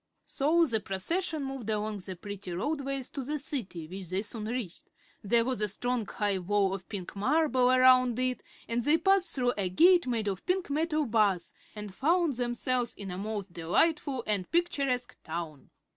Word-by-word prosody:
So 325 +5 +2
the 230 -7 0
procession 300 - -2
moved 270 -5 -5
along 215 0 -1
the 185 -1 -7
pretty 200 0 -7
roadways 275 - -2
to 275 - -5
the 300 +4 -2
City, 210 - -4
which 185 0 -8
they 190 +2 -1
soon 215 0 -6
reached. 225 -6 -5 0.3
There 230 +3 +3
was 255 -4 -2
a 210 - +3
strong 240 +2 -1
high 205 -3 -1
wall 195 +1 +1
of 190 -2 -7
pink 190 -3 -6
marble 255 +3 +2
around 255 -2 +5
it 255 -1 0 0.3
and 235 +1 -1
they 300 +5 +5
passed 385 +2 +2
through 245 -2 +1
a 190 -2 0
gate 345 - +5
made 230 -4 -1
of 195 -2 -2
pink 365 -4 0
metal 310 0 +1
bars 210 -6 +1 0.2
and 210 -2 -7
found 320 - +2
themselves 245 0 -1
in 195 -2 -7
a 180 - -5
most 205 -3 -4
delightful 260 - +1
and 200 -4 -1
picturesque 280 -8 0
town. 160 -3 -6
240 Hz, 175 wpm, -29 LUFS, 200-280 Hz, 0.3 s, around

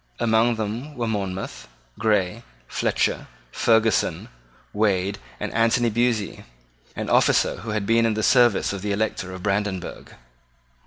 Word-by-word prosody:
Among 115 +1 +3
them 115 +7 -4
were 120 - -2
Monmouth, 95 -3 -4 0.3
Grey, 105 -1 +1 0.3
Fletcher, - - -1 0.2
Ferguson, 110 -2 +2 0.4
Wade, 100 -2 +1 0.2
and - - -4
Anthony 115 +1 +2
Buyse, 115 -2 0 0.5
an - - -4
officer - - +3
who 115 - -8
had 105 -1 -1
been 115 +1 +3
in 110 - 0
the 110 - -2
service 120 -6 +4
of 100 - -5
the 100 0 -1
Elector 100 -3 -2
of 95 -1 -8
Brandenburg. 100 -2 -3
110 Hz, 130 wpm, -23 LUFS, 100-115 Hz, 0.5 s, service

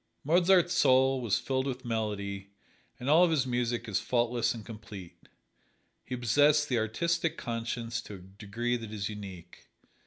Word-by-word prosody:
Mozart's 175 +3 +4
soul 130 -3 +4
was 115 -5 +1
filled 130 0 -1
with 130 -1 -5
melody, 100 -4 -3 0.5
and 125 - -6
all 160 +5 +6
of 180 - +4
his 150 -5 +1
music 120 -2 -1
is 100 -3 0
faultless 120 -1 0
and 110 -3 -7
complete. 100 -6 -11 0.7
He 125 - -5
possessed 145 +5 +3
the 125 -3 +2
artistic 165 +10 -1
conscience 115 0 -3
to 105 - -9
a - - -9
degree 105 +6 -4
that 115 -2 -8
is 105 -2 -3
unique. 95 -5 -10
120 Hz, 155 wpm, -30 LUFS, 105-130 Hz, 0.7 s, all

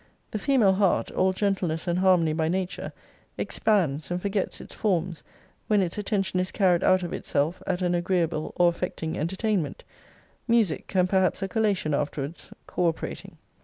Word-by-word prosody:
The 215 - -2
female 225 -5 +4
heart 195 -1 +1
(all 185 0 +2
gentleness 185 -4 -1
and 175 +1 +1
harmony 180 -4 +4
by 160 0 0
nature) 185 +2 -2 0.5
expands, 160 -9 0
and 175 0 -1
forgets 200 +1 -2
its - - -10
forms, 175 -5 -1 0.4
when 210 -2 +3
its 170 - -3
attention 195 -3 -1
is 185 0 -1
carried 180 -4 +2
out 185 0 +4
of 175 - -4
itself 150 +5 -1
at 185 -1 -1
an 175 0 +1
agreeable 175 -3 0
or 175 - +4
affecting 170 -2 -2
entertainment 185 0 -1 0.6
music, 230 -8 +1
and 180 -1 +4
perhaps 190 +1 +1
a - - 0
collation 200 -7 0
afterwards, 145 +2 -3 0.2
co 180 - 0
operating. 165 - -4
180 Hz, 160 wpm, -26 LUFS, 165-195 Hz, 0.6 s, female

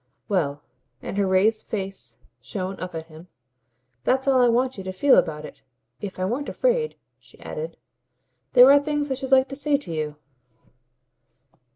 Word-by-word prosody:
"Well" 145 -7 -1 0.4
and - - -5
her 200 - +2
raised 200 +4 +2
face 195 -2 -5 0.2
shone 190 -2 -5
up 180 -1 -6
at 160 0 -5
him 160 +2 -14 0.8
"that's 265 +2 +1
all 260 -2 +4
I 245 - +5
want 250 +2 +1
you - - -6
to 190 - -3
feel 265 +9 +4
about 155 -2 +1
it. - - -12 0.4
If 200 -2 -6
I 185 - -1
weren't 250 +9 -2
afraid," 485 -2 0 0.2
she - - -19
added, 485 0 -6 0.8
"there 255 +1 +9
are 285 - +7
things 295 -1 -2
I - - +3
should 265 0 -6
like 265 0 +5
to 275 - -6
say 290 0 +1
to 180 - -6
you." 155 -1 -3
225 Hz, 175 wpm, -24 LUFS, 185-275 Hz, 0.8 s, there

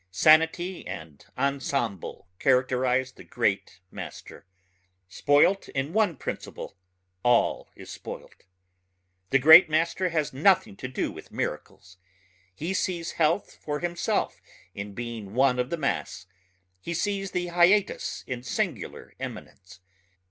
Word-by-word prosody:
Sanity 165 - +3
and 80 -3 -8
ensemble 135 - -2
characterize 130 0 +2
the - - -14
great 100 -6 -1
master... - - -9 0.6
spoilt 145 - +3
in 135 +4 -3
one 210 -6 +2
principle - - -6 0.5
all 120 +1 +2
is - - -11
spoilt. - - -10 0.8
The 135 - +4
great 160 +6 +9
master 170 +4 +1
has 155 -5 -1
nothing 155 - +3
to 130 - -5
do 130 - -2
with - - -12
miracles. 95 +1 -5 0.6
He 165 - -3
sees 175 -3 -2
health 165 +4 0
for 150 -1 -3
himself 175 -1 -1 0.3
in 100 0 -7
being 115 -3 -6
one 130 -1 +3
of 125 +1 -1
the 170 - -2
mass... 140 - -2 0.5
he 170 - -5
sees 195 +2 -1
the 175 -1 -2
hiatus 175 +4 +2
in 125 -2 -5
singular 125 - -4
eminence. 90 -2 -9
140 Hz, 120 wpm, -26 LUFS, 120-170 Hz, 0.8 s, great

